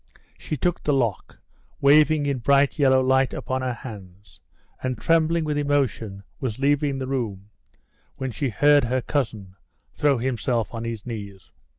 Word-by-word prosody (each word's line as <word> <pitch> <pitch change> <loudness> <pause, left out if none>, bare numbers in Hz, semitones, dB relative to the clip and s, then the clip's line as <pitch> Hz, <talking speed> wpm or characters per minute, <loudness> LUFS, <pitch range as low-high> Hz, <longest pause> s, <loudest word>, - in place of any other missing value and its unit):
She 155 - -5
took 175 +6 -1
the 150 - +1
lock, 120 -6 -2 0.4
waving 150 +1 +5
in 140 -3 -1 0.3
yellow 130 -3 +3
light 130 0 +2
upon 130 0 -3
her 130 -1 -1
hands, 100 -5 -12 0.4
and, 130 -1 -2
trembling 165 0 +2
with 150 -1 -1
emotion, 130 -9 -1 0.2
was 125 -6 -3
leaving 140 0 +1
the 135 - -3
room, 105 -7 -4 0.6
when 130 -1 -4
she 135 +4 -2
heard 145 +3 +4
her 125 +1 -1
cousin 110 -10 -3 0.4
throw 145 -2 +2
himself 120 -2 -1
on 115 0 -5
his 115 -3 -5
knees. 100 - -8
130 Hz, 150 wpm, -24 LUFS, 115-145 Hz, 0.6 s, waving